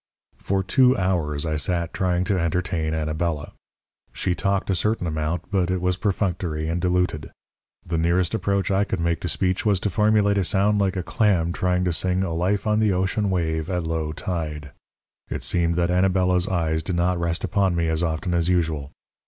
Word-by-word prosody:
"For 95 0 -1
two 130 +5 +4
hours 85 -6 0
I 80 -1 -1
sat 85 +2 -1
trying 90 -1 0
to 95 -1 0
entertain 85 -1 -1
Anabela. 80 0 -2 0.6
She 90 - -1
talked 95 +3 0
a - - +1
certain 105 +1 0
amount, 80 +2 -3
but 95 -3 +1
it 95 0 0
was 90 +1 0
perfunctory 90 -6 -1
and 85 +2 -1
diluted. 90 -4 0 0.6
The 85 -1 -1
nearest 85 +3 +1
approach 100 -2 0
I 95 +1 +3
made 85 -1 -1
to - - -3
speech 95 0 0
was 100 -4 +2
to 105 - -1
formulate 105 0 +3
a - - +2
sound 100 +3 +2
like 95 -1 +1
a 90 - -2
clam 85 -5 +1
trying 90 0 0
to 90 -2 0
sing 90 +2 0
'A 85 -3 -2
Life 95 +4 0
on 105 0 +2
the 110 -2 +3
Ocean 95 +3 0
Wave' 80 -3 -1
at 90 -2 -1
low 80 -1 -2
tide. 75 -4 -4 0.6
It - - -4
seemed 85 -2 +1
that 85 0 +1
Anabela's 90 0 +2
eyes 80 -4 0
did 90 +1 -3
not 90 +1 +1
rest 85 -1 -1
upon 95 -3 +1
me 85 -1 0
as 80 0 0
often 85 +1 -1
as 85 0 +1
usual. 80 -6 0
90 Hz, 190 wpm, -23 LUFS, 80-95 Hz, 0.6 s, two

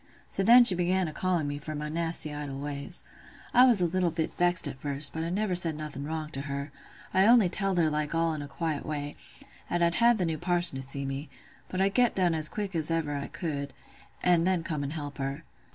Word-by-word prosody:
So - - 0
then 240 +5 +8
she 220 - +6
began 180 +1 +1
a 155 - -6
calling 175 -3 -1
me 145 0 -4
for 155 +1 -6
my 150 0 -4
nasty 165 -1 -3
idle 145 -2 -6
ways. 140 0 -5 0.5
I 250 +2 +7
was 230 -7 +5
a - - +3
little 180 +1 0
bit 160 -1 -3
vexed 175 -2 +3
at 135 -2 -7
first, 140 +1 -4
but 160 - -4
I 165 - -2
never 195 +1 -1
said 170 -3 +3
nothing 150 -2 -6
wrong 155 0 -4
to 135 - -4
her: 140 0 -5 0.4
I 190 +2 +4
only 230 -6 +6
telled 195 0 -1
her 165 -2 +3
like 150 +1 -2
all 165 0 +1
in 155 - -5
a 145 - -7
quiet 155 0 -3
way, 145 -1 -4 0.6
'at 175 0 0
I'd 170 0 +2
had 235 +3 +4
th' 185 - 0
new 160 -2 -2
parson 175 -3 +2
to - - -5
see 135 +1 -1
me; 135 +2 -5 0.4
but 185 - -4
I'd 195 +1 +2
get 245 0 +3
done 180 -3 +2
as 155 -1 +4
quick 205 -2 -4
as 160 -2 +1
ever 160 -3 -1
I 140 - -4
could, 140 -5 -5 0.5
an' 175 -2 +4
then 180 -2 +1
come 155 -4 -3
an' 140 - -3
help 145 -2 -6
her. 135 0 -4
160 Hz, 240 wpm, -28 LUFS, 145-180 Hz, 0.6 s, then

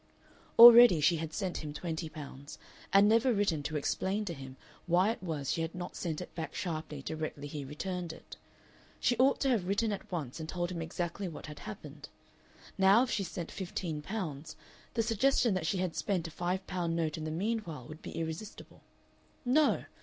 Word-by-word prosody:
Already 235 -6 +11
she 165 +3 +3
had 160 0 -4
sent 185 +1 -3
him 150 -1 -6
twenty 160 -1 -4
pounds, 145 -2 -9 0.3
and 200 +1 +6
never 230 +4 +4
written 200 -8 +1
to 150 +1 -3
explain 195 +8 -1
to 175 - -3
him 135 -3 -10 0.3
why 180 +5 +4
it 230 - -6
was 155 -6 -3
she 165 - -1
had 165 +1 -3
not 180 -1 -6
sent 160 -4 -3
it 180 - -9
back 160 -2 -5
sharply 155 -5 -4
directly 155 -2 -4
he 145 0 -5
returned 175 +5 -4
it. 160 - -12 0.6
She 245 - +2
ought 265 +2 +4
to 275 - +2
have 215 -8 +1
written 205 +3 +1
at 200 - -6
once 155 -6 -4
and 160 0 -6
told 175 0 -2
him 170 -2 -4
exactly 175 +3 -3
what 165 - -8
had 150 -1 -9
happened. 105 - -9 0.7
Now 195 +5 +6
if 255 - -3
she 200 - 0
sent 175 -2 -6
fifteen 175 -4 -4
pounds 160 -5 -5 0.4
the 230 - +2
suggestion 230 +1 +2
that 180 -4 -1
she 190 - 0
had 180 -2 -2
spent 180 -5 -1
a - - -9
five 180 +4 -2
pound 175 -3 -2
note 160 -2 -1
in 160 - -6
the 155 - -3
meanwhile 170 - -3
would 155 +1 -10
be - - -8
irresistible. 165 +6 -6 0.6
No! 285 +5 +3
175 Hz, 195 wpm, -31 LUFS, 155-200 Hz, 0.7 s, Already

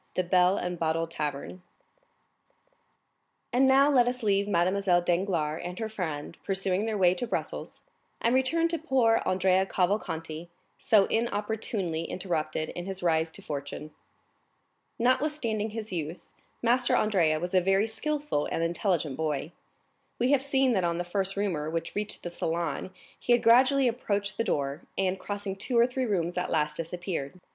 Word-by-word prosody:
The 185 - +1
Bell 180 +1 +3
and 180 -1 -3
Bottle 165 0 0
Tavern 150 +2 -4 1.9
And 260 +2 +4
now 270 +1 +6
let 245 -3 +4
us 250 0 -2
leave 200 -1 +2
Mademoiselle 185 -1 +2
Danglars 170 -4 0
and 180 +1 -6
her 220 -1 -3
friend 165 -6 -5
pursuing 195 +1 0
their 220 -2 -1
way 180 -2 +5
to 210 +7 -3
Brussels, - - -4 0.4
and 235 - +2
return 295 +6 +2
to 335 -1 -1
poor 255 -7 +3
Andrea 185 0 +3
Cavalcanti, 170 -4 -2 0.3
so 205 -3 +4
inopportunely 210 -6 -2
interrupted 160 -4 -2
in 175 +1 -6
his 190 -1 -5
rise 160 -1 +2
to - - -9
fortune. 145 +1 -6 1.1
Notwithstanding 245 -4 +1
his 220 0 -6
youth, 165 -1 -5 0.4
Master 245 +1 +3
Andrea 170 -7 +2
was 175 +2 -4
a 185 - +5
very 195 +3 +3
skilful 290 - -2
and 165 - 0
intelligent 170 -4 0
boy. 155 0 -2 0.7
We 245 +3 +2
have 280 -2 +4
seen 270 -2 +2
that 190 -4 +1
on 170 -1 0
the 175 - -1
first 195 +2 -2
rumor 170 -7 -1
which 165 +1 -3
reached 210 0 -3
the 175 - -5
salon 170 +2 -2 0.3
he 245 - +2
had 240 - +3
gradually 255 +3 +5
approached 205 -4 -1
the 230 - +1
door, 140 -4 -1 0.2
and 190 0 0
crossing 200 -1 -4
two 240 +5 -1
or 235 - +7
three 255 0 -2
rooms 180 -3 0
at 180 - -2
last 150 -2 0
disappeared. 175 -1 -4
190 Hz, 160 wpm, -28 LUFS, 165-225 Hz, 1.9 s, or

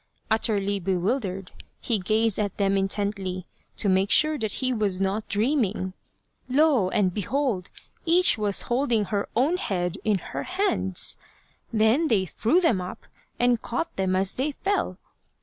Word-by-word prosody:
Utterly 205 -2 +1
bewildered, 190 +1 -2 0.3
he 230 -4 -1
gazed 215 +3 +2
at 205 -2 -2
them 195 -1 +1
intently 195 -2 -1 0.3
to 210 - +2
make 190 +1 +2
sure 310 0 +5
that 220 -3 -1
he 255 -1 0
was 205 -5 +1
not 195 +3 -1
dream 245 +7 +2
ing. 190 -2 -3 0.6
Lo! 270 -7 +3
and 185 -2 +1
behold! 215 -3 -1 0.3
each 350 +2 +5
was 210 -2 +1
holding 240 -4 +1
her 200 +1 -2
own 285 +10 +2
head 180 - -2
in 210 -2 +2 0.2
her - - -2
hands. 365 - -1 0.5
They 220 0 +4
then 200 -8 +2
threw 225 - +1
them 250 - +2
up 180 +1 -8 0.3
and 245 -1 +2
caught 330 +8 -3
them 190 -1 0
as 190 +1 +1
they 285 +3 -2
fell. 400 +7 -1
210 Hz, 150 wpm, -25 LUFS, 190-250 Hz, 0.6 s, sure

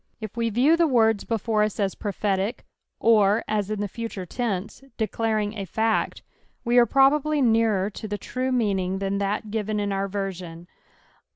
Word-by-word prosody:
If 215 -2 -7
we 230 -1 0
riew 255 +9 +4
the 335 -1 +3
words 225 -6 +2
before 225 -1 0
us 210 0 -1
as 195 -2 0
prophetic, 200 +2 -2 0.3
or 215 -1 +4
as 210 -2 -1
in 215 -1 -2
the 205 - -1
future 225 -3 -6
tense, 215 -1 -3 0.2
declaring 220 -1 -1
a 200 -2 -4
fact, 220 +4 -1 0.4
we 240 +1 +4
are 240 - +5
probably 290 +2 +3
nearer 225 -5 +2
to 215 - -7
the 205 0 -3
true 255 +4 -3
meaning 195 -6 0
than 195 0 -2
that 200 +2 -1
fiven 215 -1 -2
!□ 205 -1 -1
our 195 0 -1
version. 185 -4 -5
215 Hz, 170 wpm, -25 LUFS, 200-230 Hz, 0.4 s, are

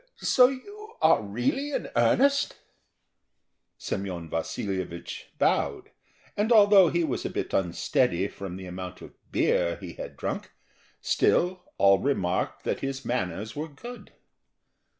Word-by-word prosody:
So 250 -1 +5
you 410 +12 -8
are 160 -4 +5
really 120 - -2
in - - -2
earnest?" 280 +1 +3 1.2
Semyon 90 -4 -4
Vasilyevich 85 +1 -4
bowed, - - 0 0.4
and 210 +3 0
although 205 -5 +7
he 170 +1 +1
was 140 -6 -2
a - - -2
bit - - -4
unsteady 95 +1 +1
from 100 -3 -7
the 95 - -8
amount 90 0 -7
of - - -12 0.2
beer 85 -1 +2
he 90 -3 -9
had - - -8
drunk, - - -4 0.5
still 180 +1 +1
all 100 0 +5
remarked 95 -11 -1
that - - -1
his 135 0 -4
manners 105 -2 -2
were 150 +2 -3
good. 240 - -11
120 Hz, 130 wpm, -27 LUFS, -, 1.2 s, although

